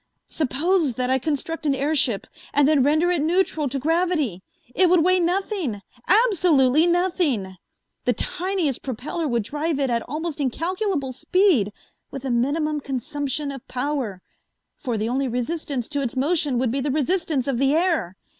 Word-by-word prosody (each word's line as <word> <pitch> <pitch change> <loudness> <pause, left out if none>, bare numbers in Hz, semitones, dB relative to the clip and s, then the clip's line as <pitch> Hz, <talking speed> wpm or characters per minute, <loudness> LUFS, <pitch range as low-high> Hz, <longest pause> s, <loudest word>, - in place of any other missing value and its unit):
Suppose 315 0 0
that 255 0 -1
I 265 - +3
construct 310 +3 -3
an 275 - +2
airship 275 -6 +1 0.3
and 290 -1 +5
then 300 -2 +4
render 310 +6 +3
it 345 -4 +1
neutral 320 -3 +1
to 275 - -3
gravity. 310 - 0 0.3
It 370 -2 +4
would 350 -2 +4
weigh 370 0 +5
nothing, 350 - -1 0.2
absolutely 345 - +4
nothing! 340 - +1 0.5
The 245 - +3
tiniest 360 - -1
propeller 280 +6 -4
would 235 -4 0
drive 300 +6 -2
it 270 -3 0
at 235 0 +1
almost 315 +1 -4
incalculable 330 - -1
speed 270 - +2 0.4
with 275 -1 -7
a 260 - -1
minimum 295 +5 0
consumption 280 +2 -3
of 270 -1 -10
power, 250 -8 -3 0.5
for 245 -5 -3
the 215 +1 -1
only 265 +3 0
resistance 250 +1 -3
to 285 -1 -1
its 265 -1 -3
motion 290 -2 +1
would 245 -1 0
be 275 - -1
the 280 +2 -1
resistance 305 -1 0
of 260 -4 -1
the 275 +2 +3
air. 320 - 0
290 Hz, 160 wpm, -23 LUFS, 255-335 Hz, 0.5 s, and